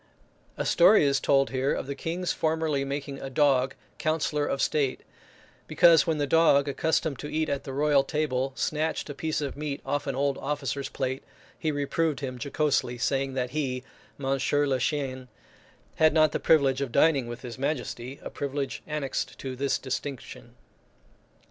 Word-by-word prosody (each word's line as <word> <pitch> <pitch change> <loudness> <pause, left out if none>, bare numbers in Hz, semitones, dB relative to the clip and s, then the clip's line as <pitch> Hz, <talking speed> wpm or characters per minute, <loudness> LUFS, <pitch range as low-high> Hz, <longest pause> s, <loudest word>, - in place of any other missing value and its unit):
A - - -2
story 175 -1 +6
is 140 -1 +2
told 135 +2 +2
here 135 +1 0
of - - -4
the 140 - -4
King's 170 +5 -3
formerly 160 -3 0
making 140 0 -5
a 135 - -5
dog 135 -1 +2 0.2
counsellor 155 -2 0
of 135 - -1
state, 140 -3 0 0.7
because 165 0 +5
when 160 -2 +1
the 145 - +1
dog, 145 -2 +4
accustomed 155 -1 0
to 150 - -6
eat 155 0 0
at 140 -1 -2
the 135 - -5
royal 145 0 +3
table, 135 -3 -1
snatched 155 0 -1
a - - -5
piece 155 +2 -2
of 140 -2 -3
meat 145 -1 -4
off 145 0 -2
an 135 - -1
old 140 0 0
officer's 140 -1 -3
plate, 130 -1 -3 0.4
he 155 - 0
reproved 145 +1 -1
him 130 -3 -5
jocosely, 140 -4 0
saying 135 +2 -1
that 125 -1 -2
he, 130 -4 -2 0.3
monsieur 135 +1 +1
le 135 -2 0
chien, 130 -4 -2 0.7
had 155 -1 +5
not 155 -1 +5
the - - -2
privilege 140 -4 +3
of 135 -3 -2
dining 140 -2 +3
with 120 +2 -7
his 120 -1 -7
majesty, 130 -2 -3
a - - -6
privilege 140 -1 -3
annexed 150 -3 -3
to 130 -1 -5
this 140 +2 0
distinction. 135 0 -6
140 Hz, 170 wpm, -27 LUFS, 135-150 Hz, 0.7 s, story